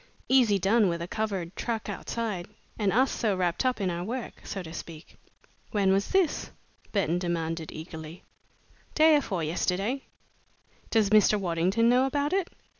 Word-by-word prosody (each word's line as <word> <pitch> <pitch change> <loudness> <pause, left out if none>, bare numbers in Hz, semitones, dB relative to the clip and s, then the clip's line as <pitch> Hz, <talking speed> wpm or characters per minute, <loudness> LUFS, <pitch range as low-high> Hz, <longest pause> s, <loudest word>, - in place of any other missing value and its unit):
Easy 245 -6 +4
done 200 +2 +3
with 170 0 -2
a 170 - -4
covered 195 -4 -3
truck 230 -3 -3
outside 210 -6 -4 0.3
and 205 -2 +2
us 255 +7 +3
so 210 -4 0
wrapped 175 +2 0
up 255 -2 +1
in 190 -3 0
our 170 0 -3
work, 235 +5 -5
so 195 - -5
to 160 -1 -9
speak." 165 -1 -9 0.5
"When 200 -3 +2
was 195 +1 +2
this?" 380 -5 +1 0.4
Burton 175 -4 +1
demanded, 165 -2 -2
eagerly. 160 +1 -9 0.7
"Day 315 0 +6
afore 195 - 0
yesterday." 190 - -1 0.9
"Does 215 -3 +2
Mr. 210 0 +5
Waddington 185 +5 +1
know 250 +2 +4
about 285 +4 -1
it?" 385 -2 +1
200 Hz, 155 wpm, -28 LUFS, 175-235 Hz, 0.9 s, Day